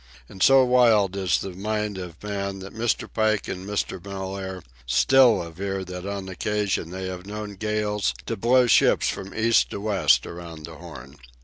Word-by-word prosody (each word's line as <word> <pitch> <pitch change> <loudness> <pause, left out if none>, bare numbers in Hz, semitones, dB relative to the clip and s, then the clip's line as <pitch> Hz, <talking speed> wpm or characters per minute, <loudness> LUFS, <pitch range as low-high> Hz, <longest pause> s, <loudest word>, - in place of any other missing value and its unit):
And 95 - -12
so 135 +2 +6
wild 115 -6 +4
is 95 -2 +1
the 95 - -5
mind 105 +1 -3
of 90 -2 -9
man 100 -1 -3
that 95 0 -9
Mr. 115 0 -1
Pike 110 -2 0
and 95 +1 -6
Mr. 100 -3 -3
Mellaire 95 -1 -6 0.2
still 125 - +5
aver 95 +3 -4
that 90 +1 -7
on 100 -1 -4
occasion 100 -2 -2
they 95 +1 -5
have 90 0 -7
known 105 0 -6
gales 105 0 -1
to 115 - -2
blow 125 +4 +4
ships 120 - +4
from 95 0 -5
east 115 +1 +2
to - - -5
west 85 - +2
around 85 -2 -8
the - - -10
Horn. 70 +2 -11
100 Hz, 175 wpm, -24 LUFS, 95-105 Hz, 0.2 s, so